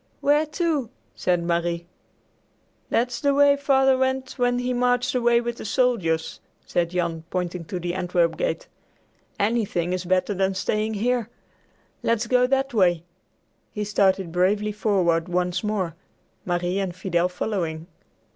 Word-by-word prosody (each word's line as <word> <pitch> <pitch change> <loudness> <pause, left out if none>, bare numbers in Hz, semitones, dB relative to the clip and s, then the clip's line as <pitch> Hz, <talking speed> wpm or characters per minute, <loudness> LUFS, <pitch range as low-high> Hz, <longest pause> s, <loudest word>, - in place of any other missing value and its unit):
"Where 295 +2 +3
to?" 305 -6 -1 0.2
said 175 -1 0
Marie. 170 0 -1 1.0
"That's 245 +1 0
the 280 -1 +2
way 285 0 +6
Father 270 -1 +3
went 260 0 0
when 245 0 +2
he 250 0 -1
marched 245 0 +1
away 240 -1 +3
with 240 0 -4
the - - -7
soldiers," 200 -9 0 0.3
said 170 -1 0
Jan, 170 -2 -2
pointing 180 -1 -3
to 180 +2 -4
the 175 0 -3
Antwerp 180 -2 +1
gate. - - -2 0.7
"Anything 200 -5 0
is 185 0 -3
better 185 +3 +1
than 190 0 0
staying 215 +3 -1
here. 240 +1 0 0.7
Let's 230 0 +1
go 250 +1 +3
that 270 0 0
way." 175 -6 +3 0.7
He 210 - -2
started 195 -3 +1
bravely 200 +4 +1
forward 185 -5 +1
once 180 +1 0
more, 200 -6 -1 0.5
Marie 175 +1 -1
and 190 -3 -3
Fidel 180 -1 0
following. 170 -4 -3
200 Hz, 140 wpm, -24 LUFS, 175-245 Hz, 1.0 s, way